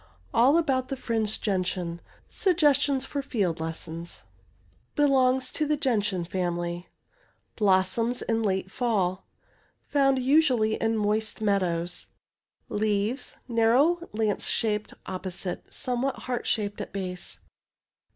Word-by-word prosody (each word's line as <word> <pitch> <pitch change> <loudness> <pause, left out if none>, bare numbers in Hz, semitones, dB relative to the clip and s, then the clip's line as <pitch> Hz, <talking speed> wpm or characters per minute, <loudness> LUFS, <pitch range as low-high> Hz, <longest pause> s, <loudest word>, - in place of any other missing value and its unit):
'' 85 - -31
ALL 265 +7 +5
ABOUT 265 -6 +1
THE 270 - -4
FRINGED 220 -4 -1
GENTIAN 180 -3 -1 0.3
SUGGESTIONS 285 -7 +2
FOR 285 +1 -3
FIELD 200 -12 -1
LESSONS 165 +1 -6 0.7
Belongs 260 -3 +3
to 300 -1 0
gentian 210 - 0
family. 175 -1 -2 0.7
Blossoms 210 +4 +2
in 225 0 0
late 190 -2 -1
fall. 195 -7 0 0.7
Fomid 275 -2 +4
usually 255 -6 +4
in 225 0 0
moist 215 +1 0
meadows. 180 -4 0 0.6
Leaves— 210 +4 0
narrow, 245 +9 +4
lance 215 -1 0
shaped— 210 -2 -1
opposite— 185 -1 -5
somewhat 255 +2 -1
heart 250 -1 -2
shaped 205 -2 -1
at - - -6
base. 180 -2 -5
220 Hz, 110 wpm, -27 LUFS, 185-260 Hz, 0.7 s, ALL